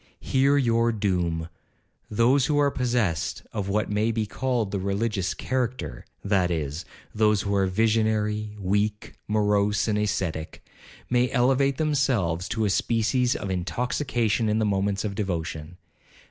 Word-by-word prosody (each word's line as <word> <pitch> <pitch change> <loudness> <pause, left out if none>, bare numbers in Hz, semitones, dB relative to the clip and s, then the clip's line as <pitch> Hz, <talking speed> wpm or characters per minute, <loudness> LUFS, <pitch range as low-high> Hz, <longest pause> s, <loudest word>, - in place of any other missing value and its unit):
Hear 135 +2 +2
your 115 -3 +2
doom—Those 100 - -1
who 150 - +1
are 145 -1 +3
possessed 120 - -1
of 100 -3 -3
what 105 +1 0
may 105 +2 +1
be 110 -1 -1
called 120 -1 -1
the 100 - -1
religious 100 0 -1
character, 125 - -3 0.2
that 95 -3 +2
is, 80 +1 -3 0.3
those 105 -1 +2
who 100 - -1
are 100 -1 +2
visionary, 105 0 0
weak, 105 +2 -1
morose 105 0 +2
and 105 -1 +1
ascetic, 90 -6 -3 0.5
may 125 0 +3
elevate 135 +1 +2
themselves 130 - 0
to 110 -1 0
a 100 - +1
species 120 +4 +1
of 100 - -4
intoxication 115 - -1
in 105 - +1
the 110 - +1
moments 100 0 0
of 100 - -2
devotion. 85 -4 -4
105 Hz, 135 wpm, -25 LUFS, 95-120 Hz, 0.5 s, are